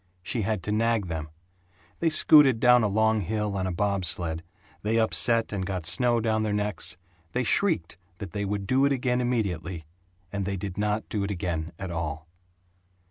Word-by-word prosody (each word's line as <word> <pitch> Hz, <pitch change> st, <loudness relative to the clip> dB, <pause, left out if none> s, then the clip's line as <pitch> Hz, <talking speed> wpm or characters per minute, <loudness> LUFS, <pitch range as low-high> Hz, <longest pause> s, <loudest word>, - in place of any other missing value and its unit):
She 115 Hz, -, -1 dB
had 105 Hz, -3 st, -2 dB
to 105 Hz, -, -3 dB
nag 110 Hz, -3 st, +1 dB
them. 80 Hz, -1 st, -4 dB, 0.7 s
They 165 Hz, -, +2 dB
scooted 150 Hz, -5 st, +6 dB
down 125 Hz, +1 st, +6 dB
a 110 Hz, -, +2 dB
long 110 Hz, +1 st, +2 dB
hill 105 Hz, +2 st, -2 dB
on 95 Hz, -1 st, -1 dB
a -, -, -2 dB
bob 100 Hz, +1 st, -1 dB
sled, 80 Hz, 0 st, -1 dB, 0.4 s
they 110 Hz, +2 st, 0 dB
upset 115 Hz, 0 st, +3 dB
and 95 Hz, -2 st, -2 dB
got 95 Hz, -3 st, -4 dB
snow 120 Hz, +4 st, +1 dB
down 110 Hz, -1 st, 0 dB
their 110 Hz, -1 st, -1 dB
necks 105 Hz, 0 st, -2 dB, 0.4 s
they 125 Hz, -, 0 dB
shrieked 120 Hz, -, +1 dB, 0.2 s
that 95 Hz, -3 st, -7 dB
they 105 Hz, -1 st, -3 dB
would 100 Hz, 0 st, -3 dB
do 130 Hz, +6 st, +2 dB
it 140 Hz, -, +2 dB
again 125 Hz, -2 st, 0 dB
immediately 95 Hz, -9 st, -2 dB, 0.5 s
and 100 Hz, -1 st, -2 dB
they 100 Hz, 0 st, -2 dB
did 95 Hz, -1 st, -5 dB
not 105 Hz, +1 st, -1 dB
do 105 Hz, -2 st, -2 dB
it 100 Hz, -, -3 dB
again 85 Hz, -3 st, -3 dB
at 95 Hz, -2 st, -6 dB
all. 80 Hz, -1 st, -4 dB
105 Hz, 190 wpm, -26 LUFS, 95-115 Hz, 0.7 s, scooted